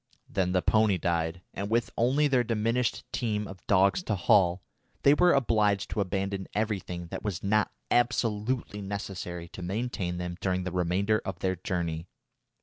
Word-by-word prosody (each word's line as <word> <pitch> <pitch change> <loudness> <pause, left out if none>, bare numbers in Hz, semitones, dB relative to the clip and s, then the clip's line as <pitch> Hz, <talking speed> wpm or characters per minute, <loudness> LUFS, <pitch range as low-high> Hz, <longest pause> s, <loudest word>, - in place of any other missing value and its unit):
Then 90 -2 0
the 90 -1 +1
pony 110 -3 +3
died, 85 +1 -1
and 100 +1 -4
with 115 +1 +1
only 135 +6 +3
their 130 -3 +3
diminished 115 +2 0
team 105 -3 -1
of 95 -2 -11
dogs 100 - +4
to 105 - 0
haul, 90 -1 +3 0.4
they 140 - +7
were 175 +4 +5
obliged 105 - +2
to 105 - 0
abandon 95 0 -2
everything 100 -5 -2
that - - -5
was 100 -6 -3
not 105 +1 +2 0.2
absolutely 120 -2 0
necessary 95 -3 -5
to 90 - -9
maintain 95 -2 -2
them 90 0 -4
during 95 -1 0
the 95 - -3
remainder 90 +5 +1
of 95 -2 -4
their 95 +1 0
journey. 85 -2 -3
100 Hz, 160 wpm, -28 LUFS, 90-110 Hz, 0.4 s, they